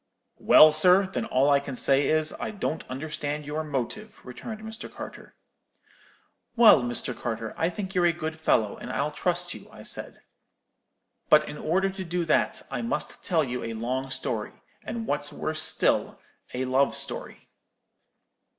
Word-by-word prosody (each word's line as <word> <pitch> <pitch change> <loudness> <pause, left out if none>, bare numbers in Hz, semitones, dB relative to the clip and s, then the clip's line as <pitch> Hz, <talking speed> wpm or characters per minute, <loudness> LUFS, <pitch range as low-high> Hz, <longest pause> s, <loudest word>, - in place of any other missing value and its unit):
"'Well, 155 0 +8
sir, 180 +5 +5
then 190 - -3
all 135 +3 +2
I 140 - +5
can 140 -2 -6
say 135 +2 +3
is, 155 0 +1
I - - -3
don't 195 -6 -3
understand 150 +2 -4
your 150 +2 -3
motive,' 155 - -4
returned, 215 - -8
Mr. 220 +1 -8
Carter. - - -10 1.2
"'Well, 210 - +6 0.2
Carter, 115 -2 -4
I 165 - +1
think 190 +1 -6
you're 180 -2 +3
a - - +4
good 160 -1 -5
fellow, 110 -9 +1
and - - -7
I'll - - -1
trust - - -1
you,' - - -12
I - - -13
said; - - -6 1.1
'but, - - +6
in 150 - -7
order 190 +5 +1
to 190 0 -6
do 175 0 -2
that, 155 - +1
I 125 -3 -2
must 115 - -3
tell 165 -3 +2
you 125 -2 -4
a 115 - -4
long 130 +4 -3
story, 135 - -4 0.2
and 230 -1 -5
what's 145 -5 -1
worse 155 0 -3
still, - - +2 0.3
a 130 +1 -2
love 130 +2 +2
story.' - - -6
155 Hz, 160 wpm, -26 LUFS, 130-180 Hz, 1.2 s, Well